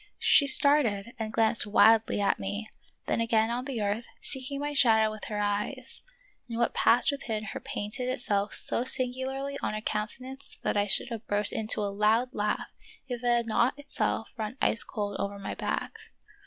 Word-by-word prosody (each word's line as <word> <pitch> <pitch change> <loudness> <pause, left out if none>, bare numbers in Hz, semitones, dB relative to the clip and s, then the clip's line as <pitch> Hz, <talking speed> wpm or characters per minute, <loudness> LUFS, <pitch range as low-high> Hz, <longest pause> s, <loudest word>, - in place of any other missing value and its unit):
She 280 - +4
started 255 -7 +4
and 220 -1 -3
glanced 225 -1 +3
wildly 220 +1 +4
at 200 -1 +1
me, 205 +3 -4 0.4
then - - 0
again 225 0 +1
on 245 +2 -3
the 250 -6 -3
earth, 205 +3 -2
seeking 270 +1 -5
my 290 +1 -3
shadow 220 -5 +4
with 215 -1 -8
her 210 - -5
eyes; 210 +5 -2 0.5
and 230 - -4
what 235 - 0
passed 240 +5 +4
within 225 -6 -4
her 215 - -6
painted 230 +5 -5
itself 205 -5 -1
so - - +5
singu 255 0 0
larly 275 +1 -4
on - - -2
her 215 - -4
countenance 255 +6 -4
that - - 0
I 205 0 +1
should 225 - 0
have 230 -2 -7
burst 205 0 +1
into 215 -1 +1
a 200 -1 -2
loud 220 +5 +2
laugh 210 0 -2 0.4
if 245 -2 -5
it - - -1
had 240 -1 +2
not 235 +4 +1
itself 290 0 -3
run 220 +3 -5
ice 230 - +5
cold 205 -2 -4
over 200 0 -3
my 200 - -6
back. - - -4
225 Hz, 185 wpm, -28 LUFS, 210-255 Hz, 0.5 s, so